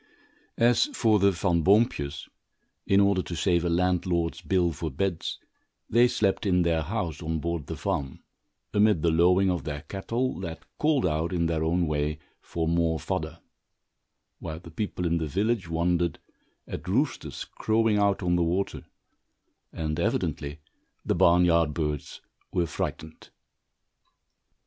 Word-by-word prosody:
As 120 - +4
for 110 - +3
the 100 +1 +5
Van 90 -2 +1
Boompjes, 90 - +2 0.6
in 100 - +4
order 100 -2 +3
to 90 - -6
save 85 +1 +1
a 85 - 0
landlord's 85 -1 0
bill 90 -3 +1
for 80 +1 -4
beds, 85 +4 -2 0.5
they 120 +2 +6
slept 105 -4 0
in 90 -2 +3
their 85 -1 +1
house, 85 -2 -3
on 80 0 -2
board 85 -2 -3
the - - -4
farm, 70 -2 -3 0.5
amid 105 -5 +3
the 85 - +3
lowing 90 +3 +4
of 90 -3 -2
their 75 -1 -4
cattle 115 +8 -3
that 85 -3 -6
called 150 -6 +2
out, 80 0 0
in 85 -2 0
their 80 -1 0
own 85 +2 +1
way, 75 -1 -1 0.2
for 80 -1 -3
more 85 -1 +1
fodder; 80 -2 -3 1.0
while 80 -2 -6
the 85 -1 -13
people 90 0 -3
in 85 0 +1
the 80 - -2
village 100 +3 0
wondered 85 0 0 0.5
at - - -7
roosters - - -1
crowing 110 -1 +1
out 100 -1 +2
on 90 0 +2
the 90 - +2
water, 90 +4 -1 0.9
and 75 -1 -3
evidently 75 +1 -2 0.4
the - - +1
barn 90 +1 +5
yard 85 -3 +2
birds 75 -3 -3 0.3
were 85 - +1
frightened. 80 0 -5
85 Hz, 150 wpm, -27 LUFS, 80-95 Hz, 1.0 s, they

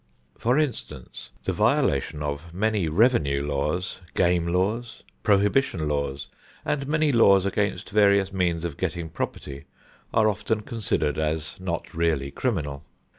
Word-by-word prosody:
For 125 +4 +1
instance, 120 - -3
the - - -1
violations 70 +2 +1
of 75 +4 -5
many 105 -2 +1
revenue 75 - +2
laws, 75 +7 -2
game 85 -1 +2
laws, 100 +7 -1 0.2
prohibition 100 - +2
laws, 70 -1 -2 0.4
and 140 -2 -1
many 155 0 +2
laws 100 -6 +5
against 100 +1 -1
various 100 -2 +4
means 85 -3 0
of 85 -5 -4
getting 85 -2 -3
property 70 -3 -5 0.5
are 110 -1 +3
often 105 +1 -1
considered 105 - -1
as 80 0 -1
not 90 -2 -4
really 80 -5 0
criminal. 75 - -2
90 Hz, 125 wpm, -25 LUFS, 75-105 Hz, 0.5 s, laws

